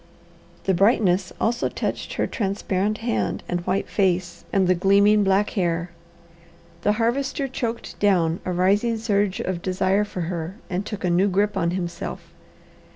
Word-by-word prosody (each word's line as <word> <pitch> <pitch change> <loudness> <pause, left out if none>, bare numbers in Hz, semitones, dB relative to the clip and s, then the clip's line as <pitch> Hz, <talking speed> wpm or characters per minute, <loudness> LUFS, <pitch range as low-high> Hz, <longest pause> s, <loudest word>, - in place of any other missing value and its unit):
The 190 - +2
brightness 190 -1 +3
also 235 +2 0
touched - - -3
her - - 0
transparent 200 -1 -1
hand 235 - -1
and 175 - -1
white 190 +2 0
face 185 -3 0
and 190 -2 +2
the 185 - +5
gleaming 200 +3 +4
black 195 +1 +2
hair. 175 -2 -1 0.9
The 210 - +2
Harvester 265 +5 0
choked 235 -3 -4
down 175 -5 +2
a 185 - -2
rising 200 +6 +2
surge 205 -3 0
of 180 -2 -3
desire 190 +2 +1
for 205 -3 -5
her, 170 +1 -4 0.2
and 190 +3 -2
took 210 -3 -6
a 180 - +1
new 180 +3 +3
grip 205 +2 +1
on 170 -3 +1
himself. 175 -1 -5
195 Hz, 155 wpm, -23 LUFS, 180-210 Hz, 0.9 s, the